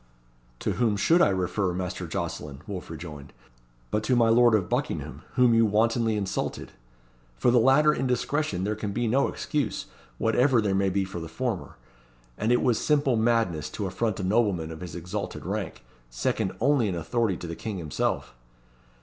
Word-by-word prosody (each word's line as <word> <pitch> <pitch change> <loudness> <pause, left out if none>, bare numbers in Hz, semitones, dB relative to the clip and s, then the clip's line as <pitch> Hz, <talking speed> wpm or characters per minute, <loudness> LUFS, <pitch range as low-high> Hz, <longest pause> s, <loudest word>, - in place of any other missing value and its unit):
"To - - 0
whom 115 -4 +1
should 165 - +4
I - - +5
refer, 95 0 0
Master 90 -1 -4
Jocelyn," 70 -1 -5
Wolfe 95 -3 -6
rejoined, 75 -3 -9 0.6
"but 105 - +1
to 125 - +2
my 115 -2 +4
lord 120 0 +6
of 95 -4 0
Buckingham, - - -3
whom 125 -2 +5
you 115 0 +5
wantonly 115 +1 +2
insulted? 100 -2 -3 0.7
For 120 - +3
the 120 - +5
latter 145 +5 +5
indiscretion 125 -4 -1
there 105 +2 0
can 105 -1 -4
be 120 +2 0
no 135 +5 +3
excuse, 140 -9 -2 0.3
whatever 125 +3 +3
there 105 -3 +1
may 95 0 +2
be 95 +1 0
for 95 -2 -6
the 80 - -6
former; 115 +1 -3 0.6
and 110 - 0
it 120 - +3
was 120 -3 +2
simple 145 -4 +2
madness 110 -9 +1
to 105 - -4
affront 100 +3 -1
a - - -3
nobleman 95 -5 +1
of 80 - -9
his 90 -3 -7
exalted 90 +1 -5
rank, - - -4 0.3
second - - -1
only 135 -2 +3
in 95 - -2
authority 95 +3 0
to - - -8
the 85 0 -5
King 105 +1 -5
himself." 75 -6 -2
105 Hz, 175 wpm, -26 LUFS, 90-120 Hz, 0.7 s, lord